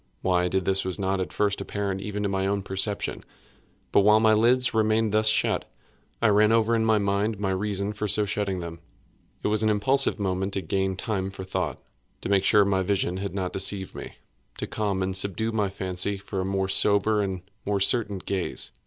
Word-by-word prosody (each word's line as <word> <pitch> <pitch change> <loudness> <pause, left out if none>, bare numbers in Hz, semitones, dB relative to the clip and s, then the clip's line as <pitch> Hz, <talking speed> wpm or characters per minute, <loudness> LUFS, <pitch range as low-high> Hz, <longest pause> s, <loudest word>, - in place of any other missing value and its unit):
Why 90 -1 +2
I - - +1
did 95 0 -1
this 95 0 +3
was 95 -1 -2
not 95 -1 -1
at 90 - -4
first 100 -1 0
apparent 100 -2 -3
even 105 +1 -4
to 100 - 0
my 95 0 -1
own 100 0 -1
perception. 95 +2 -2 0.7
But - - +4
while 105 +2 +5
my 110 0 +4
lids 125 +4 +3
remained 110 0 +1
thus 110 +1 +2
shut, 110 - +1 0.5
I 115 - +5
ran 105 +1 +4
over 115 0 +2
in 115 -1 +2
my 110 -1 +3
mind 100 +1 -1
my 100 -2 -1
reason 100 +1 -2
for 105 +1 -3
so 105 +2 +3
shutting 100 -2 -2
them. 85 -1 -7 0.6
It - - +1
was 110 0 +2
an 110 - +3
impulsive 120 +5 +3
movement 95 0 -2
to 95 - -1
gain 95 +3 -1
time 95 -1 -3
for 95 -1 -8
thought—to 95 - -6
make 100 -1 +3
sure 105 +1 +5
that 100 - -1
my 95 -1 +2
vision 95 -1 -1
had 100 -1 -5
not 95 -2 -3
deceived 95 0 -3
me—to - - -10
calm 100 -3 -2
and 95 0 -2
subdue 100 +4 +1
my 105 -3 0
fancy 95 +1 -1
for 95 0 -5
a - - -3
more 95 0 -1
sober 105 +2 +2
and 95 -3 -3 0.2
more 100 0 -1
certain 105 0 +3
gaze. 95 0 -3
100 Hz, 205 wpm, -25 LUFS, 95-105 Hz, 0.7 s, while